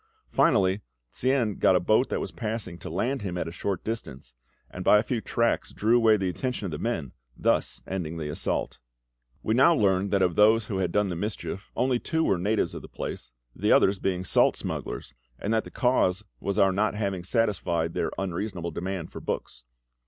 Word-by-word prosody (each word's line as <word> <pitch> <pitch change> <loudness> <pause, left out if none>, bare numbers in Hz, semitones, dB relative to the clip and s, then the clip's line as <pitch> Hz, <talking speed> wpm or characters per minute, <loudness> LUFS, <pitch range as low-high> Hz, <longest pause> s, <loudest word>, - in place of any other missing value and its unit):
Finally, 100 - +3 0.3
Tsien 125 -5 0
got 95 - +5
a - - +5
boat 110 +8 +2
that - - -1
was - - -4
passing 110 -6 -4
to - - -7
land 120 - -1
him 90 -3 -3
at 85 - -2
a - - -5
short 95 +3 -3
distance, 70 - -6 0.4
and 90 - -6
by 105 - +6
a 105 - +2
few 120 0 -2
tracts 115 +1 0
drew 110 +3 +2
away 110 -2 +5
the 95 -2 -1
attention 125 +4 -3
of 90 - -3
the 75 - -4
men, 85 - -2 0.3
thus - - 0
ending 85 -4 -4
the 80 -2 -4
assault. 75 - -2 0.6
We 110 - +1
now 135 +8 +6
learned 100 -4 +2
that 100 -1 +2
of 90 - +1
those 110 +1 +5
who 100 -2 -3
had 90 -2 0
done 105 0 +1
the 90 - -3
mischief 95 0 -4
only 125 -1 +1
two 160 +5 0
were 95 - +2
natives 105 +4 0
of - - -6
the - - -10
place, - - -6 0.3
the - - +1
others 95 0 +4
being 95 -1 -1
salt - - +4
smugglers, - - -5 0.2
and 105 - -2
that 110 - +1
the - - -8
cause 110 -6 +1 0.2
was 100 0 -2
our 95 -2 +5
not 105 +3 +1
having 100 -4 -2
satisfied 85 -6 0
their - - -1
unreasonable 90 -2 -3
demand 95 -1 -4
for - - -7
books. - - -5
100 Hz, 205 wpm, -27 LUFS, 90-110 Hz, 0.6 s, by